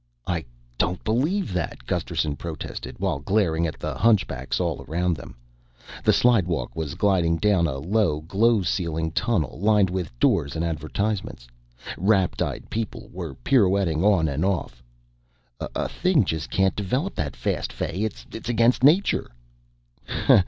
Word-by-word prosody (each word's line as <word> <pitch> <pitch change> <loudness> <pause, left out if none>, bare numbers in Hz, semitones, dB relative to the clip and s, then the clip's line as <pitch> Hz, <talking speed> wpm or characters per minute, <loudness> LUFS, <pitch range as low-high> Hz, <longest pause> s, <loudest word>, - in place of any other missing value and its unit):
"I 85 -5 -2 0.3
don't 90 +1 0
believe 135 - 0
that," 85 -8 -3
Gusterson 75 +4 -1
protested 75 -5 -6
while - - -1
glaring 85 -1 +1
at 80 - -6
the - - -4
hunchbacks 110 0 +1
around 85 +2 -1
them. - - -11 0.7
The - - +5
slidewalk 95 -12 +2
was 80 -4 -3
gliding 90 -5 +2
down 95 -3 +3
a 65 -3 -3
low 85 0 +1
glow 105 +6 +2
ceiling 80 -2 -1
tunnel 105 - 0
lined 105 -2 +3
with 90 -4 -3
doors 70 +1 +2
and 80 +1 -1
advertisements. 85 - -3 0.5
Rapt 95 -1 +2
eyed - - -3
people 110 -1 -4
were 85 -6 -6
pirouetting 95 - +3
on 95 -6 +4
and 75 +2 -1
off. 90 -11 -1 0.8
"A - - -3
thing 175 - +2
just 80 -2 -3
can't 95 0 +2
develop 125 - -1
that 70 -2 -3
fast, - - -2
Fay. 95 - -3
It's 110 - -4 0.2
against 120 +2 +3
nature." 165 - +4
90 Hz, 140 wpm, -24 LUFS, 80-105 Hz, 0.8 s, The